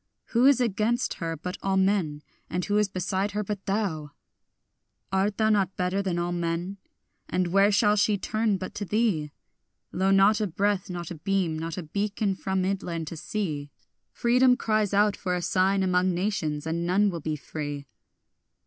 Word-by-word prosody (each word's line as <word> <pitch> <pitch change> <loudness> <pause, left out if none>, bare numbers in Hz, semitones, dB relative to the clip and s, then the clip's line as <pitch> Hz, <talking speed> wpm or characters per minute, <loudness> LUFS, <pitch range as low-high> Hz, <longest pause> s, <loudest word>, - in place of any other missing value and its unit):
Who 245 +3 +4
is 280 -3 +5
against 230 +1 0
her 165 -1 -2
but 180 +4 -6
all 195 0 0
men? 190 -7 +1 0.3
and 180 0 -2
who 205 0 +2
is 210 - +2
beside 190 +2 -2
her 210 +1 -1
but 200 -1 -5
thou? 175 -8 -2 1.0
Art 195 +2 +1
thou 220 -1 +3
not 195 -3 +1
better 185 +2 0
than 185 -3 -2
all 175 0 -1
men? 175 +2 -2 0.5
and 180 -1 0
where 195 +3 +4
shall 205 +1 +4
she 210 0 +2
turn 215 0 0
but 185 0 -6
to 210 - -4
thee? 200 -8 0 0.6
Lo, 190 +1 +1
not 195 +3 +5
a 210 - +1
breath, 195 +2 0
not 175 -2 -5
a - - -5
beam, 180 -3 0
not 165 +1 -4
a 180 - -4
beacon 200 +4 -1
from 190 0 -2
midland 180 -4 -2
to - - -7
sea; 155 -5 -3 0.4
Freedom 250 +1 +3
cries 215 -2 +1
out 205 0 +3
for 180 -1 -2
a 180 - -2
sign 190 +2 +2
among 180 -1 +2
nations, 165 -6 -2
and 165 +1 -2
none 195 +4 +2
will 170 -2 -5
be 155 +1 -2
free. 145 -1 -6
190 Hz, 180 wpm, -26 LUFS, 175-205 Hz, 1.0 s, is